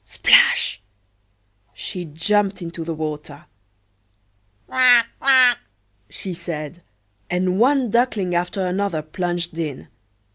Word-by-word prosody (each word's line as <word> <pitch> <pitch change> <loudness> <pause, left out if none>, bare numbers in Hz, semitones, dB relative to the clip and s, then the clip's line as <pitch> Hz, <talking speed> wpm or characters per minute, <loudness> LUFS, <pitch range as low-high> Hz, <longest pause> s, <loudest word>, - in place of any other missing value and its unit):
Splash! 105 - +3 0.9
she 180 -3 -5
jumped 195 +6 0
into 170 -1 -7
the 165 0 -5
water. 150 -2 -6 1.2
"Quack! 245 -2 +4
quack!" 260 -2 +5 0.5
she 190 - -4
said, 170 -1 -7 0.5
and 180 +1 -1
one 260 -1 +2
duckling 220 -6 0
after 180 +2 -1
another 180 -3 -2
plunged 175 +1 -4
in. 150 -5 -5
180 Hz, 100 wpm, -21 LUFS, 165-210 Hz, 1.2 s, quack